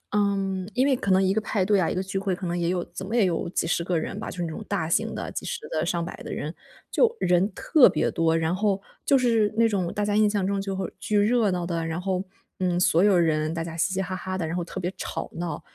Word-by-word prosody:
嗯， 195 -2 0
因 260 +3 +2
为 270 - +4
可 200 -5 -1
能 190 +1 +5
一 190 0 +2
个 220 - +1
派 210 -2 0
对 205 -1 +3
啊， 170 - +2
一 - - -1
个 185 - -1
聚 195 0 -4
会， 195 -1 0
可 180 0 -5
能 175 +1 -1
也 170 -1 0
有 180 -1 0
怎 190 - -8
么 220 +5 -3
也 220 -5 +4
有 170 -2 -1
几 - - -1
十 170 - 0
个 175 -1 0
人 - - -5
吧， - - -5
就 - - -10
是 175 - -1
那 165 - -3
种 160 +7 -6
大 190 -6 -1
型 - - +1
的 - - -4
几 - - -5
十 470 -1 -5
个、 - - -1
上 170 -1 -1
百 170 - -6
的 - - -6
人， 155 +3 -4 0.3
就 470 -1 +3
人 180 +3 +2
特 300 - +5
别 - - 0
多。 165 0 +1
然 165 +2 +1
后 200 -1 +1 0.2
就 275 - +5
是 230 -4 +2
那 230 - +5
种 185 -5 -1
大 210 - -1
家 205 - 0
印 215 0 +5
象 205 -2 0
中 200 0 0
就 195 -1 -3
会 190 -2 -3
巨 210 +1 +1
热 215 0 +3
闹 180 -1 -1
的， 170 -1 -2
然 165 +2 -3
后， 185 0 -1 0.4
嗯， 180 -1 +1
所 175 -1 +4
有 205 -2 +5
人 155 -1 +1
大 165 -1 -2
家 165 0 -6
嘻 190 +3 +1
嘻 190 - 0
哈 185 0 -3
哈 185 0 -4
的， 170 -3 -2
然 165 - -3
后 175 - -1
特 180 - -6
别 180 0 -2
吵 165 - -4
闹。 165 -3 -4
185 Hz, 310 characters per minute, -25 LUFS, 170-205 Hz, 0.4 s, 能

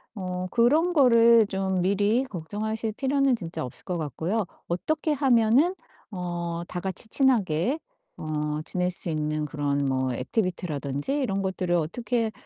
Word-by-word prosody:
어 185 -2 -4
그런 300 +10 +3
거를 230 -6 +6
좀 190 -2 -1
미리 205 +7 +2
걱정하실 215 +3 -3
필요는 270 +1 +2
진짜 165 -6 -5
없을 125 - -9
것 180 - -2
같고요. 165 - -2 0.2
어떻게 305 - -1
하면은 260 +4 +3 0.4
어 175 -2 -4
다 180 - -4
같이 190 +4 -3
친하게 235 - +2 0.4
어 150 -1 -2
지낼 180 0 0
수 175 - -1
있는 155 -1 -1
그런 145 -2 -1
뭐 130 -1 0
액티비티라든지 150 - -2
이런 195 -7 -1
것들을 185 -2 -1
어떻게 220 +7 -1
190 Hz, 290 characters per minute, -26 LUFS, 165-235 Hz, 0.4 s, 거를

